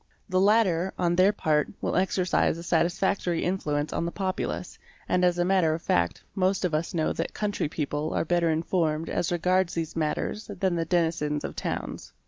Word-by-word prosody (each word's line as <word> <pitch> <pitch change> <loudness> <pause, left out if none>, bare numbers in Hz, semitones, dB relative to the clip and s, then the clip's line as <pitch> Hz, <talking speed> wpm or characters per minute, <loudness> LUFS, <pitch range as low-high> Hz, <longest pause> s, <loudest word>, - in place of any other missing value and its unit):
The 185 0 +2
latter, 190 -4 +3
on 175 -1 +1
their 185 +3 +5
part, 155 -7 +1
will - - -2
exercise 185 -2 +1
a 170 - -7
satisfactory 175 0 +1
influence 150 -5 -1
on - - -1
the 170 - -2
populace 190 -1 -3 0.3
and 180 0 +2
as 175 -1 +3
a 175 - +2
matter 180 -4 +3
of 165 - -7
fact 85 0 0
most 190 0 +1
of 175 - -1
us 160 +3 -1
know 160 -2 +1
that - - -4
country 205 -7 -1
people 150 0 -2
are - - +1
better 170 0 +2
informed 160 -1 0
as 175 - -1
regards 180 +1 +1
these 165 -1 -3
matters 165 +7 -2
than 190 -3 +1
the 165 -1 -1
denizens 160 -4 0
of - - -5
towns. - - -4
170 Hz, 185 wpm, -27 LUFS, 160-185 Hz, 0.3 s, their